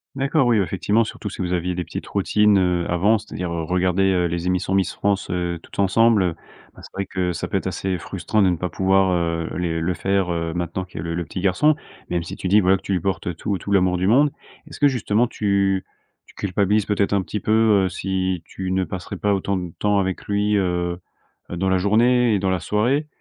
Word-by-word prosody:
D'accord. 135 Hz, 0 st, +1 dB
Oui, 120 Hz, -2 st, +4 dB
bah, 100 Hz, -, +3 dB
effectivement, 100 Hz, +5 st, +1 dB
surtout 105 Hz, -1 st, -6 dB
si 100 Hz, -, -7 dB
vous 90 Hz, 0 st, -1 dB
aviez 90 Hz, 0 st, -1 dB
des 90 Hz, -, -2 dB
petites -, -, -7 dB
routines, 105 Hz, +1 st, +3 dB
heu, 90 Hz, -2 st, +1 dB
avant. 100 Hz, +6 st, +3 dB
C'est-à-dire, 90 Hz, -4 st, -6 dB
heu, 85 Hz, -1 st, -2 dB
regarder, 90 Hz, +2 st, +1 dB
heu, 90 Hz, -2 st, +1 dB
les 85 Hz, +1 st, -2 dB
émissions 90 Hz, +1 st, 0 dB
Miss 95 Hz, -1 st, +1 dB
France, 100 Hz, -1 st, -1 dB
heu, 85 Hz, -1 st, -2 dB
toutes -, -, -15 dB
ensemble, 105 Hz, +2 st, +4 dB
heu, 85 Hz, -3 st, -1 dB, 0.4 s
ben, -, -, -15 dB
c'est -, -, -13 dB
vrai 100 Hz, -, -3 dB
que 90 Hz, -2 st, -2 dB
ça 85 Hz, -, -4 dB
peut -, -, -1 dB
être 95 Hz, -, -3 dB
assez 95 Hz, 0 st, -2 dB
frustrant 105 Hz, +6 st, -1 dB
de 95 Hz, -, +4 dB
ne 90 Hz, -, +1 dB
pas 90 Hz, +2 st, -3 dB
pouvoir, 95 Hz, 0 st, +2 dB
heu, 85 Hz, -1 st, -1 dB
les 85 Hz, -2 st, -1 dB
le 85 Hz, +3 st, 0 dB
faire, 95 Hz, 0 st, 0 dB
heu, 85 Hz, -1 st, -2 dB
maintenant 90 Hz, +2 st, -3 dB
qu'il 90 Hz, -, -13 dB
y -, -, -3 dB
a -, -, -5 dB
le 85 Hz, -1 st, -3 dB
le 85 Hz, +1 st, -2 dB
petit 90 Hz, -, -6 dB
garçon. 100 Hz, +12 st, +3 dB, 0.3 s
Même 85 Hz, -1 st, -1 dB
si 85 Hz, -, -7 dB
tu -, -, -4 dB
dis, 105 Hz, +3 st, +5 dB
voilà, 95 Hz, +1 st, +4 dB
que -, -, -17 dB
tu 100 Hz, -, -3 dB
lui 90 Hz, -, +1 dB
portes, 95 Hz, +1 st, -2 dB
heu, 90 Hz, -, -1 dB
tout 100 Hz, +4 st, -2 dB
tout 100 Hz, -, -6 dB
l'amour 90 Hz, -2 st, +3 dB
du 90 Hz, +1 st, 0 dB
monde. 140 Hz, +7 st, +4 dB, 0.4 s
Est-ce -, -, -11 dB
que 145 Hz, -, +5 dB
justement 120 Hz, -3 st, +1 dB
tu 100 Hz, -3 st, 0 dB, 0.4 s
tu -, -, -19 dB
culpabilises 100 Hz, +2 st, +1 dB
peut-être 100 Hz, -1 st, 0 dB
un 100 Hz, -, +2 dB
petit 105 Hz, +3 st, -4 dB
peu, 105 Hz, -, -2 dB, 0.3 s
heu, -, -, 0 dB
si 95 Hz, -1 st, -2 dB
tu 95 Hz, -1 st, -5 dB
ne 95 Hz, 0 st, +1 dB
passerais 90 Hz, -1 st, -6 dB
pas 105 Hz, 0 st, +1 dB
autant 100 Hz, +1 st, -1 dB
de 90 Hz, -2 st, -5 dB
temps 105 Hz, -1 st, +2 dB
avec 95 Hz, -1 st, -2 dB
lui, 105 Hz, +1 st, +1 dB
heu 90 Hz, -2 st, 0 dB, 0.5 s
heu, 90 Hz, -, -4 dB
dans 95 Hz, +2 st, 0 dB
la 95 Hz, -, +3 dB
journée 115 Hz, +5 st, +3 dB
et 100 Hz, -, +2 dB
dans 95 Hz, 0 st, 0 dB
la 95 Hz, -1 st, 0 dB
soirée? 120 Hz, -, 0 dB
95 Hz, 250 wpm, -22 LUFS, 90-100 Hz, 0.5 s, dis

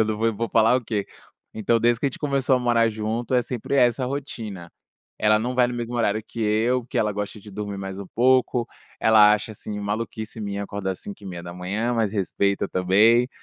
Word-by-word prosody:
eu 110 Hz, -, +5 dB
nã 110 Hz, -, -1 dB
vou 115 Hz, +1 st, +1 dB
vou 115 Hz, 0 st, -2 dB
falar 115 Hz, +2 st, +4 dB
o 130 Hz, -, -3 dB
quê? 105 Hz, -3 st, -2 dB, 0.5 s
Então, 110 Hz, +2 st, +1 dB
desde 120 Hz, 0 st, +2 dB
que 140 Hz, -, +1 dB
a -, -, +3 dB
gente 135 Hz, -, -10 dB
começou 135 Hz, -3 st, +1 dB
a -, -, +1 dB
morar 120 Hz, -2 st, +3 dB
junto, 110 Hz, +3 st, -2 dB
é 125 Hz, -, +5 dB
sempre 125 Hz, +3 st, -3 dB
essa 125 Hz, 0 st, +3 dB
rotina, 115 Hz, -10 st, -6 dB, 0.5 s
ela 105 Hz, 0 st, +4 dB
não 125 Hz, +3 st, -2 dB
vai 125 Hz, -1 st, +4 dB
no -, -, -4 dB
mesmo 120 Hz, 0 st, -4 dB
horário 110 Hz, -2 st, +1 dB
que 115 Hz, -, -8 dB
eu, 110 Hz, +4 st, +2 dB
porque 115 Hz, -, -4 dB
ela 105 Hz, -1 st, +1 dB
gosta 105 Hz, +1 st, -5 dB
de 105 Hz, -, -12 dB
dormir 100 Hz, 0 st, -5 dB
mais 95 Hz, 0 st, -6 dB
um 100 Hz, -, -7 dB
pouco, 125 Hz, -1 st, +3 dB, 0.3 s
ela 105 Hz, -1 st, +7 dB
acha, 105 Hz, +1 st, -1 dB
assim, 105 Hz, 0 st, -7 dB
maluquice 110 Hz, +1 st, -4 dB
minha 100 Hz, -1 st, -3 dB
acordar 100 Hz, -1 st, -3 dB
5h30, 95 Hz, +4 st, -4 dB
mas 110 Hz, -3 st, 0 dB
respeita 100 Hz, 0 st, 0 dB
também, 105 Hz, +7 st, +4 dB
110 Hz, 205 wpm, -24 LUFS, 100-120 Hz, 0.5 s, ela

